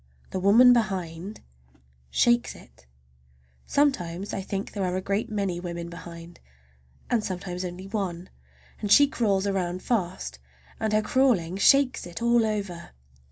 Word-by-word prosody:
The 190 Hz, -, -2 dB
woman 230 Hz, +6 st, +7 dB
behind 190 Hz, -4 st, -2 dB, 0.7 s
shakes 240 Hz, -, +2 dB
it! 60 Hz, 0 st, -18 dB, 0.8 s
Sometimes 200 Hz, -, 0 dB
I 195 Hz, -, -2 dB
think 195 Hz, +1 st, -4 dB
there 200 Hz, -, -2 dB
are 180 Hz, -1 st, -1 dB
a -, -, 0 dB
great 200 Hz, +5 st, -2 dB
many 200 Hz, -5 st, -2 dB
women 170 Hz, -1 st, -6 dB
behind, 170 Hz, 0 st, -10 dB, 0.7 s
and 230 Hz, -3 st, +2 dB
sometimes 180 Hz, -1 st, -4 dB
only 180 Hz, +1 st, -6 dB
one, 190 Hz, -4 st, -4 dB, 0.5 s
and 205 Hz, -, -2 dB
she 285 Hz, -, +8 dB
crawls 205 Hz, -8 st, 0 dB
around 185 Hz, -2 st, -2 dB
fast, 175 Hz, -, -2 dB, 0.4 s
and 220 Hz, -, -1 dB
her 215 Hz, 0 st, +2 dB
crawling 210 Hz, -10 st, +2 dB
shakes 270 Hz, +1 st, +4 dB
it 170 Hz, -, -8 dB
all 235 Hz, -1 st, +3 dB
over. 200 Hz, -5 st, -4 dB
195 Hz, 140 wpm, -26 LUFS, 175-220 Hz, 0.8 s, she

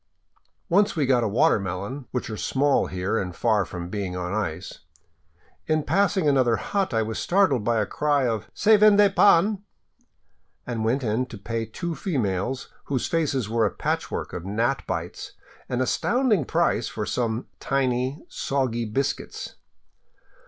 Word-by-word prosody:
Once 200 Hz, +3 st, +3 dB
we 150 Hz, -4 st, +1 dB
got 125 Hz, -2 st, +3 dB
a -, -, +1 dB
watermelon, 105 Hz, -, 0 dB
which 125 Hz, -, -3 dB
are 110 Hz, -, -5 dB
small 140 Hz, +5 st, +1 dB
here 95 Hz, +4 st, -1 dB
and 90 Hz, -2 st, -4 dB
far 110 Hz, -4 st, +2 dB
from 85 Hz, 0 st, -6 dB
being 95 Hz, -1 st, -4 dB
on 90 Hz, +1 st, -3 dB
ice. 100 Hz, -7 st, -4 dB, 0.9 s
In 155 Hz, -1 st, +1 dB
passing 195 Hz, -3 st, +2 dB
another 130 Hz, -5 st, +3 dB
hut 195 Hz, -, -1 dB
I 115 Hz, -2 st, +1 dB
was 110 Hz, 0 st, -4 dB
startled 175 Hz, -, +2 dB
by 115 Hz, +1 st, +1 dB
a 105 Hz, -, +1 dB
cry 145 Hz, +1 st, +1 dB
of 110 Hz, -3 st, -3 dB
" -, -, -48 dB
Se 215 Hz, 0 st, +5 dB
vende 205 Hz, -2 st, +6 dB
pan," 200 Hz, +1 st, +5 dB, 1.0 s
and 115 Hz, -3 st, -3 dB
went 125 Hz, +5 st, +1 dB
in 115 Hz, +3 st, 0 dB
to 115 Hz, -, -9 dB
pay 115 Hz, +2 st, -4 dB
two 170 Hz, +9 st, -4 dB
females, 125 Hz, -, -2 dB, 0.2 s
whose 135 Hz, -3 st, -1 dB
faces 145 Hz, -, 0 dB
were 115 Hz, 0 st, +2 dB
a -, -, -1 dB
patchwork -, -, -3 dB
of 85 Hz, -, -5 dB
gnat 115 Hz, +8 st, -1 dB
bites, 85 Hz, -1 st, -5 dB, 0.4 s
an 125 Hz, 0 st, -1 dB
astounding 220 Hz, -, +1 dB
price -, -, +1 dB
for -, -, -4 dB
some 115 Hz, -1 st, -1 dB
tiny, 130 Hz, +2 st, -1 dB
soggy 125 Hz, -4 st, -1 dB
biscuits. 135 Hz, +6 st, -3 dB
125 Hz, 155 wpm, -25 LUFS, 110-150 Hz, 1.0 s, vende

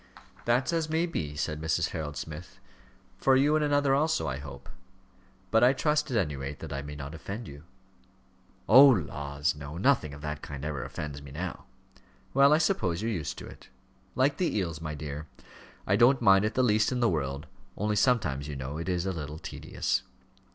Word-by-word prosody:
"That's 125 Hz, +6 st, +2 dB
as 165 Hz, -2 st, 0 dB
may 160 Hz, +2 st, +1 dB
be," 75 Hz, -, -4 dB
said 75 Hz, +1 st, -3 dB
Mrs. 80 Hz, +1 st, 0 dB
Harold 75 Hz, -3 st, -5 dB
Smith. 80 Hz, +3 st, -8 dB, 0.6 s
"For 135 Hz, -, +4 dB
you 145 Hz, +3 st, +4 dB
and 155 Hz, -, +2 dB
another 145 Hz, -2 st, +2 dB
also, 155 Hz, +3 st, +1 dB
I 65 Hz, -, -2 dB
hope. 70 Hz, -1 st, -10 dB, 0.8 s
But 115 Hz, +1 st, +4 dB
I 125 Hz, +2 st, +6 dB
trust, 150 Hz, +2 st, +1 dB
at 125 Hz, -, 0 dB
any 75 Hz, -9 st, 0 dB
rate, 70 Hz, +1 st, -5 dB
that -, -, -7 dB
I 70 Hz, -, -3 dB
may 75 Hz, +1 st, -8 dB
not 70 Hz, +1 st, -7 dB
offend 100 Hz, +7 st, -7 dB
you?" 70 Hz, +2 st, -11 dB, 1.0 s
"Oh, 130 Hz, +6 st, +10 dB
laws, 75 Hz, -, 0 dB
no; 75 Hz, +2 st, -8 dB
nothing 95 Hz, -, +2 dB
of 70 Hz, -, -12 dB
that 75 Hz, -1 st, -4 dB
kind 70 Hz, 0 st, -7 dB
ever 75 Hz, -4 st, -3 dB
offends 75 Hz, -3 st, -6 dB
me 70 Hz, -, -11 dB
now." 85 Hz, +6 st, -6 dB, 0.7 s
"Well, 140 Hz, +1 st, +6 dB
I 150 Hz, -, +6 dB
suppose 110 Hz, -, 0 dB
you're 115 Hz, -, 0 dB
used 75 Hz, -, -3 dB
to -, -, -8 dB
it." -, -, -13 dB, 0.5 s
"Like 140 Hz, +3 st, +2 dB
the 175 Hz, -11 st, 0 dB
eels, 85 Hz, -5 st, -2 dB
my 75 Hz, -2 st, -4 dB
dear. 75 Hz, +1 st, -6 dB, 0.6 s
I -, -, +2 dB
don't 125 Hz, +2 st, +5 dB
mind 100 Hz, -3 st, +5 dB
it 110 Hz, -, -2 dB
the 130 Hz, -, +3 dB
least 110 Hz, -1 st, +3 dB
in 125 Hz, -, -1 dB
the 120 Hz, -, +3 dB
world 70 Hz, -5 st, -2 dB, 0.3 s
only 105 Hz, +1 st, 0 dB
sometimes, 100 Hz, -, +1 dB
you 75 Hz, -, -5 dB
know, 70 Hz, +3 st, -5 dB
it 85 Hz, -, -4 dB
is 90 Hz, 0 st, 0 dB
a 95 Hz, -, 0 dB
little 75 Hz, -2 st, -6 dB
tedious." -, -, -2 dB
85 Hz, 200 wpm, -28 LUFS, -, 1.0 s, Oh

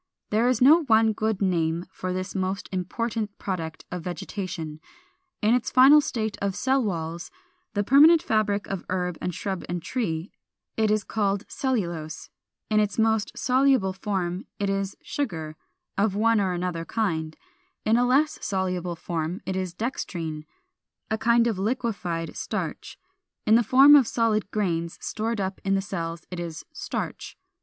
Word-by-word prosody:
There 220 Hz, +3 st, +3 dB
is 255 Hz, 0 st, +1 dB
no 310 Hz, +6 st, +7 dB
one 220 Hz, -2 st, +4 dB
good 215 Hz, -2 st, -1 dB
name 170 Hz, -2 st, 0 dB
for 185 Hz, -1 st, -4 dB
this 185 Hz, +1 st, -3 dB
most 190 Hz, 0 st, -2 dB
important 210 Hz, +3 st, -3 dB
product 165 Hz, -5 st, -4 dB
of 180 Hz, -1 st, -4 dB
vegetation. 175 Hz, -3 st, -5 dB, 0.6 s
In 215 Hz, +2 st, +4 dB
its 250 Hz, -1 st, +1 dB
final 270 Hz, +4 st, +7 dB
state 220 Hz, -6 st, -3 dB
of 200 Hz, -1 st, -1 dB
cell 265 Hz, +4 st, +2 dB
walls, 170 Hz, -4 st, -3 dB, 0.5 s
the 205 Hz, -, +2 dB
permanent 305 Hz, +8 st, +7 dB
fabric 215 Hz, -5 st, +1 dB
of 195 Hz, -3 st, -4 dB
herb 180 Hz, -2 st, -2 dB
and 180 Hz, -, -1 dB
shrub 190 Hz, +1 st, -4 dB
and 175 Hz, 0 st, -1 dB
tree, 175 Hz, -3 st, -3 dB, 0.4 s
it 220 Hz, -1 st, +2 dB
is 215 Hz, -1 st, +2 dB
called 200 Hz, -2 st, -1 dB
Cellulose 170 Hz, -, -3 dB, 0.4 s
(408): 215 Hz, -, 0 dB
in -, -, +6 dB
its 210 Hz, -, -3 dB
most 220 Hz, -1 st, +1 dB
soluble 255 Hz, -6 st, +3 dB
form 190 Hz, -2 st, -3 dB
it 200 Hz, -1 st, 0 dB
is 195 Hz, 0 st, -2 dB
Sugar 160 Hz, -, -3 dB, 0.4 s
of 200 Hz, -1 st, +2 dB
one 225 Hz, 0 st, +3 dB
or 190 Hz, -2 st, 0 dB
another 175 Hz, -1 st, -2 dB
kind; 160 Hz, -6 st, -2 dB, 0.5 s
in 220 Hz, -, +4 dB
a 245 Hz, -, +4 dB
less 285 Hz, +5 st, +2 dB
soluble 180 Hz, -2 st, -1 dB
form 165 Hz, +2 st, -3 dB
it 190 Hz, -, -2 dB
is 185 Hz, -2 st, -3 dB
Dextrine, 170 Hz, -, -4 dB, 0.7 s
a 220 Hz, -, +1 dB
kind 235 Hz, +1 st, +4 dB
of 220 Hz, -5 st, 0 dB
liquefied 200 Hz, -7 st, -2 dB
starch: -, -, -4 dB, 0.5 s
in 215 Hz, -, +4 dB
the 235 Hz, -, +7 dB
form 270 Hz, +6 st, +7 dB
of 270 Hz, -5 st, +6 dB
solid 220 Hz, -4 st, +1 dB
grains 170 Hz, -6 st, -1 dB
stored 225 Hz, 0 st, -3 dB
up 190 Hz, 0 st, -3 dB
in 195 Hz, 0 st, +2 dB
the -, -, +2 dB
cells 165 Hz, -4 st, -4 dB
it 180 Hz, -, -5 dB
is 170 Hz, -2 st, -6 dB
Starch. -, -, -5 dB
200 Hz, 160 wpm, -26 LUFS, 175-225 Hz, 0.7 s, no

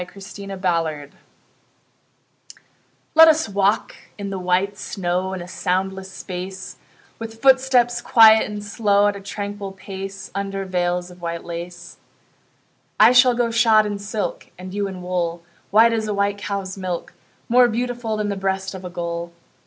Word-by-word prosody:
VELVET 195 Hz, +2 st, -10 dB, 0.3 s
SHOES 165 Hz, -6 st, -1 dB, 2.0 s
Let 325 Hz, +1 st, +9 dB
us 315 Hz, 0 st, +4 dB
walk 200 Hz, +1 st, 0 dB, 0.2 s
in 200 Hz, -1 st, -5 dB
the 190 Hz, -, -4 dB
white 185 Hz, +2 st, 0 dB
snow 185 Hz, -1 st, -2 dB
In 185 Hz, -2 st, -5 dB
a -, -, -11 dB
soundless 190 Hz, +1 st, -2 dB
space; 185 Hz, +1 st, -7 dB, 0.4 s
With 225 Hz, 0 st, -8 dB
footsteps 255 Hz, -2 st, +4 dB
quiet 220 Hz, -1 st, +6 dB
and 210 Hz, 0 st, -6 dB
slow, 205 Hz, -1 st, +2 dB
At 205 Hz, -, -4 dB
a 200 Hz, -, -8 dB
tranquil 200 Hz, 0 st, -6 dB
pace, 195 Hz, 0 st, -8 dB
Under 195 Hz, 0 st, -3 dB
veils 180 Hz, -1 st, -1 dB
of 180 Hz, 0 st, -15 dB
white 170 Hz, 0 st, -4 dB
lace. 175 Hz, +1 st, -8 dB, 1.0 s
I -, -, +8 dB
shall 250 Hz, 0 st, +6 dB
go 235 Hz, -1 st, 0 dB
shod 225 Hz, -2 st, +4 dB
in 205 Hz, -1 st, -3 dB
silk, 205 Hz, -3 st, -4 dB
And 185 Hz, +1 st, -9 dB
you 200 Hz, 0 st, -1 dB
in 185 Hz, -2 st, -8 dB
wool, 175 Hz, -2 st, -2 dB, 0.3 s
White 225 Hz, +3 st, +5 dB
as 220 Hz, -1 st, -1 dB
a 210 Hz, -, -2 dB
white 200 Hz, 0 st, 0 dB
cow's 195 Hz, -1 st, -4 dB
milk, 180 Hz, -2 st, -4 dB, 0.3 s
More 245 Hz, +1 st, +5 dB
beautiful 240 Hz, -1 st, -2 dB
Than 210 Hz, -1 st, -1 dB
the 200 Hz, -, -2 dB
breast 190 Hz, 0 st, -2 dB
of 190 Hz, -1 st, -8 dB
a 180 Hz, -, -6 dB
gull. 170 Hz, 0 st, -4 dB
195 Hz, 155 wpm, -21 LUFS, 180-215 Hz, 2.0 s, Let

